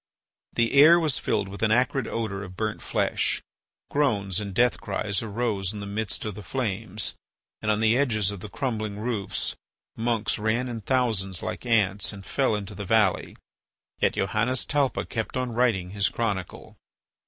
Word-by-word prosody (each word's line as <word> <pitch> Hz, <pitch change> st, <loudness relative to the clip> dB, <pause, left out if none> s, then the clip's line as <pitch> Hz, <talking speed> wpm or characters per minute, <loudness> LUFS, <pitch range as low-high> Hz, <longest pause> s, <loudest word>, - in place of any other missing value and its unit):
The 115 Hz, -1 st, +2 dB
air 155 Hz, +5 st, +8 dB
was 155 Hz, -6 st, +1 dB
filled 100 Hz, -, 0 dB
with 100 Hz, +1 st, -8 dB
an 110 Hz, -1 st, +3 dB
acrid 125 Hz, +2 st, +2 dB
odour 110 Hz, -4 st, -2 dB
of 90 Hz, -2 st, -9 dB
burnt 110 Hz, -1 st, -2 dB
flesh. -, -, 0 dB, 0.5 s
Groans 105 Hz, -10 st, +1 dB
and 100 Hz, -2 st, -4 dB
death 120 Hz, +5 st, +2 dB
cries 100 Hz, -1 st, -1 dB
arose 105 Hz, -3 st, -1 dB
in 105 Hz, -, -6 dB
the 100 Hz, -, -5 dB
midst 100 Hz, +1 st, -2 dB
of 105 Hz, -, -3 dB
the 105 Hz, -, -8 dB
flames, 105 Hz, -5 st, -2 dB, 0.5 s
and 110 Hz, -, -1 dB
on 105 Hz, 0 st, +2 dB
the 115 Hz, +1 st, +4 dB
edges 110 Hz, -7 st, +2 dB
of 100 Hz, -, -7 dB
the 105 Hz, -, -8 dB
crumbling 110 Hz, +1 st, -2 dB
roofs 110 Hz, -3 st, -2 dB, 0.4 s
monks 115 Hz, -2 st, 0 dB
ran 115 Hz, +4 st, +1 dB
in 115 Hz, -2 st, -5 dB
thousands 105 Hz, -7 st, 0 dB
like -, -, -4 dB
ants, 105 Hz, -4 st, +2 dB
and 100 Hz, -2 st, -10 dB
fell 130 Hz, -6 st, +1 dB
into 100 Hz, -2 st, -5 dB
the 100 Hz, -, -6 dB
valley. 105 Hz, -1 st, +2 dB, 0.6 s
Yet -, -, +3 dB
Johannes 115 Hz, +6 st, +1 dB
Talpa 145 Hz, -3 st, +1 dB
kept 115 Hz, +2 st, -3 dB
on 125 Hz, -1 st, -1 dB
writing 110 Hz, -7 st, +1 dB
his 100 Hz, 0 st, +2 dB
Chronicle. 100 Hz, -6 st, -3 dB
110 Hz, 170 wpm, -26 LUFS, 100-120 Hz, 0.6 s, air